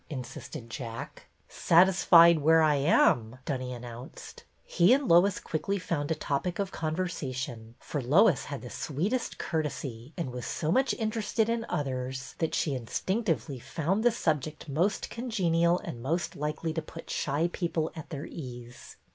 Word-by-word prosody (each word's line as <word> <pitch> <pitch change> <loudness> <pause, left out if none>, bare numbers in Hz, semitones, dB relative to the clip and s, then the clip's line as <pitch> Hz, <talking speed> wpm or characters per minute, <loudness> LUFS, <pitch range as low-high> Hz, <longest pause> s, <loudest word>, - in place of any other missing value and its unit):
insisted 130 -1 -7
Jack. 115 0 -7 0.2
Satisfied 170 -1 +6
where 160 +2 +5
I 155 -1 +4
am," 130 -5 +3
Dunny 130 -3 -3
announced. 120 0 -9 0.2
He 180 +6 +4
and 275 0 +1
Lois 175 +2 +5
quickly 195 +5 -2
found 155 -6 -2
a 160 - +1
topic 155 +4 -2
of 195 -1 -2
conversa 160 -5 -3
tion, 120 -3 -6
for 145 - -4
Lois 155 - +4
had 140 -2 -6
the 125 - -8
sweetest 195 - -2
courtesy 140 -5 -4
and 165 -7 -3
was 125 -1 -6
so 155 0 -1
much 260 +6 +2
interested 220 0 -1
in 230 0 -1
others 130 -4 -3
that 160 - 0
she 150 - 0
instinctively 160 - -2
found 175 - -1
the 240 - +6
subject 155 - -2
most 170 +9 0
congenial 175 -8 +1
and 120 - -7
most 160 +6 -2
likely 150 +2 -3
to 160 - -2
put 155 - -10
shy 150 +4 0
people 165 -3 -1
at 160 - -8
their 145 -2 -5
ease. 120 -4 -9
155 Hz, 155 wpm, -29 LUFS, 130-180 Hz, 0.2 s, Satisfied